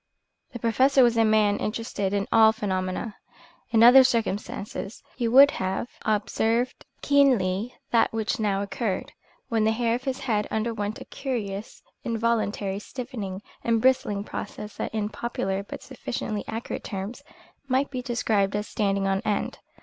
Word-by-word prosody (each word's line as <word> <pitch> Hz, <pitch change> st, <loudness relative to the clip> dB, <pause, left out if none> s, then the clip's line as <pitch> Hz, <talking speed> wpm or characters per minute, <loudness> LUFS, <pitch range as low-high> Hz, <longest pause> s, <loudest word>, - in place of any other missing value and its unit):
The 250 Hz, -, -6 dB
professor 260 Hz, +4 st, +4 dB
was 240 Hz, -1 st, +4 dB
a 225 Hz, -, +4 dB
man 215 Hz, -2 st, +3 dB
interested 215 Hz, -3 st, -2 dB
in 200 Hz, +1 st, -1 dB
all 220 Hz, -1 st, +7 dB
phenomena. 195 Hz, 0 st, -3 dB, 0.5 s
In 225 Hz, -1 st, +4 dB
other 255 Hz, +3 st, +9 dB
circumstances 215 Hz, -3 st, -2 dB
he 240 Hz, -2 st, -1 dB
would 275 Hz, +5 st, +8 dB
have 190 Hz, +5 st, -2 dB
observed 225 Hz, +3 st, 0 dB, 0.2 s
keenly 245 Hz, -7 st, +2 dB, 0.2 s
that 230 Hz, -1 st, +3 dB
which 220 Hz, -1 st, -2 dB
now 200 Hz, -2 st, 0 dB
occurred, 200 Hz, -1 st, -3 dB, 0.4 s
when 225 Hz, -3 st, +1 dB
the 220 Hz, -, +3 dB
hair 230 Hz, 0 st, +1 dB
of 250 Hz, +3 st, -3 dB
his 265 Hz, 0 st, -2 dB
head 210 Hz, -4 st, 0 dB
underwent 220 Hz, -1 st, -2 dB
a -, -, -9 dB
curious 215 Hz, -6 st, -5 dB, 0.2 s
involuntary 220 Hz, -4 st, -1 dB
stiffening 210 Hz, -5 st, -6 dB, 0.2 s
and 230 Hz, -1 st, +2 dB
bristling 235 Hz, -5 st, +2 dB
process 210 Hz, 0 st, -7 dB
that -, -, -3 dB
in 210 Hz, -1 st, -2 dB
popular 195 Hz, -4 st, -3 dB
but 200 Hz, -, -9 dB
sufficiently 235 Hz, -5 st, -4 dB
accurate 225 Hz, +1 st, -5 dB
terms, 200 Hz, +6 st, -5 dB, 0.5 s
might 265 Hz, +2 st, +1 dB
be 255 Hz, -2 st, -3 dB
described 220 Hz, -5 st, 0 dB
as 210 Hz, +1 st, -2 dB
"standing 200 Hz, -2 st, 0 dB
on 195 Hz, 0 st, +1 dB
end." 205 Hz, -, -2 dB
220 Hz, 150 wpm, -26 LUFS, 205-240 Hz, 0.5 s, other